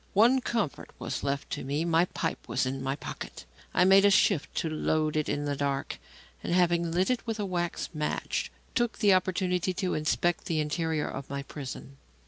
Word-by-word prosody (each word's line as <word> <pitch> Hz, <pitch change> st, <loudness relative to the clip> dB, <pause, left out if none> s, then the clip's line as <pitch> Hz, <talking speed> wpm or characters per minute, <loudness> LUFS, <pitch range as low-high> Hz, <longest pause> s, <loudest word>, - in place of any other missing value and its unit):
One 240 Hz, +6 st, +5 dB
comfort 230 Hz, -, -2 dB
was -, -, -4 dB
left 140 Hz, 0 st, -2 dB
to -, -, -3 dB
me; 145 Hz, +5 st, -1 dB
my 165 Hz, 0 st, +4 dB
pipe -, -, -4 dB
was -, -, 0 dB
in 135 Hz, +1 st, -3 dB
my 135 Hz, +1 st, -1 dB
pocket. -, -, -8 dB, 0.3 s
I 180 Hz, -, +4 dB
made 195 Hz, +2 st, +7 dB
shift 195 Hz, -5 st, +3 dB
to -, -, 0 dB
load 155 Hz, 0 st, 0 dB
it 155 Hz, -1 st, 0 dB
in 145 Hz, 0 st, -1 dB
the 145 Hz, -1 st, -1 dB
dark, 140 Hz, 0 st, -2 dB, 0.4 s
and, 175 Hz, -, -1 dB
having 170 Hz, -2 st, +3 dB
lit 185 Hz, +7 st, +2 dB
it 250 Hz, -1 st, -2 dB
with 225 Hz, -1 st, -2 dB
a 205 Hz, -, 0 dB
wax 175 Hz, -2 st, -2 dB
match, 155 Hz, -, -2 dB, 0.2 s
took 240 Hz, -2 st, 0 dB
the 205 Hz, -3 st, +5 dB
opportunity 185 Hz, 0 st, +1 dB
to 185 Hz, -1 st, -1 dB
inspect 160 Hz, +3 st, 0 dB
the 160 Hz, -2 st, 0 dB
interior 155 Hz, 0 st, -1 dB
of 135 Hz, -, -6 dB
my 140 Hz, 0 st, -3 dB
prison. 140 Hz, -1 st, -8 dB
170 Hz, 190 wpm, -29 LUFS, 145-190 Hz, 0.4 s, made